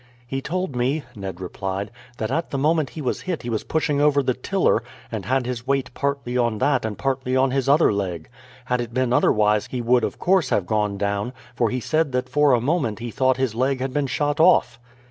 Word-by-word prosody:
"He 135 +2 -3
told 175 0 -3
me," 135 +5 0
Ned 95 -3 -6
replied, 95 +2 -4 0.3
"that 110 +2 -3
at 165 +4 -1
the 140 - -3
moment 155 +1 +2
he 155 - -7
was 125 - -1
hit 180 -3 -4
he 120 - -4
was 110 - -1
pushing 150 -2 0
over 145 -1 +4
the 130 - +1
tiller, 175 - +1 0.3
and 110 -5 -4
had 130 0 +1
his 125 -1 -4
weight 135 -2 0
partly 140 -3 -2
on 120 -2 +1
that 140 +2 +1
and 110 -2 -4
partly 130 -1 -1
on 130 0 +3
his 135 0 0
other 145 -5 +5
leg. 90 -6 -3 0.4
Had 125 0 0
it 120 0 -6
been 130 -1 +1
otherwise 105 -3 +3
he 125 - -4
would 120 +1 +3
of - - -2
course 180 -7 +2
have 100 - +1
gone 105 0 0
down, 100 +4 -2 0.2
for 120 -2 +1
he 125 - -2
said 155 +2 0
that 125 0 -1
for 145 0 +4
a 120 - +4
moment 130 - 0
he 120 0 -6
thought 130 +2 +2
his 130 -4 0
leg 130 +3 0
had 130 0 -3
been 145 0 0
shot 145 +2 -1
off." 170 -7 +4
130 Hz, 225 wpm, -23 LUFS, 115-140 Hz, 0.4 s, other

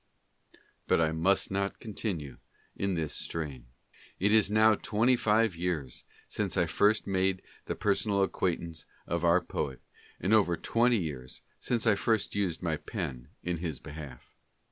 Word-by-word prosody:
But - - +4
I 80 -1 +3
must 90 +6 +2
not 100 0 -1
con 110 - -8
tinue 75 - -3 0.4
in 100 -1 -1
this 80 -3 -1
strain. 70 -7 -4 0.5
It 100 +3 +3
is 110 -3 +5
now 110 +1 +5
twenty 115 +4 +2
five 110 -3 +2
years 85 -7 -3 0.2
since 100 -4 -1
I 85 - +4
first 105 +6 +2
made 95 -1 0 0.2
the - - -2
personal 100 -1 +1
ac 95 - 0
quaintance 85 -3 -2 0.2
of 85 0 -2
our 85 +1 +5
poet, 70 -6 -3 0.4
and 95 - +1
over 95 -6 +4
twenty 120 +6 +2
years 70 -9 -5 0.2
since 120 -2 0
I 110 - +6
first 110 +1 0
used 95 -4 -1
my 80 -3 0
pen 60 -4 -5 0.2
in 90 -1 -1
his 80 -4 -3
behalf. 75 -5 -10
90 Hz, 160 wpm, -30 LUFS, 80-105 Hz, 0.5 s, I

